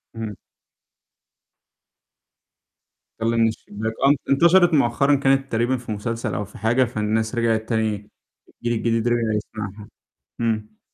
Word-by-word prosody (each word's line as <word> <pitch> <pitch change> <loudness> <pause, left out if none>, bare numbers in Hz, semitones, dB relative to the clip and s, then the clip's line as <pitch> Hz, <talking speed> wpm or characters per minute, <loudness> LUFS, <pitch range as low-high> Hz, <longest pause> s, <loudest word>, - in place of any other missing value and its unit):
إمم. 110 -2 -5 2.8
طَل 115 +1 0
من 115 0 +4
الشباك، 110 0 -4
آه، 135 - +6
ان 145 - +5
انتشرت 170 +5 +5
مؤخرًا 140 +1 +3
كانت 135 0 +1
تقريبًا 120 +3 +1
في 120 -2 -8
مسلسل 115 +1 -3
أو 105 - -2
في 100 - -14
حاجة، 120 +4 +2
فالناس 110 -1 -1
رجعت 115 -2 0
تاني 110 -3 -1 0.4
الجيل 120 -1 -3
جديد 115 0 +1
رجع 120 -2 +1
يسمعها، 105 -1 -6 0.5
إمم. 110 -2 -2
115 Hz, 125 wpm, -22 LUFS, 110-120 Hz, 2.8 s, آه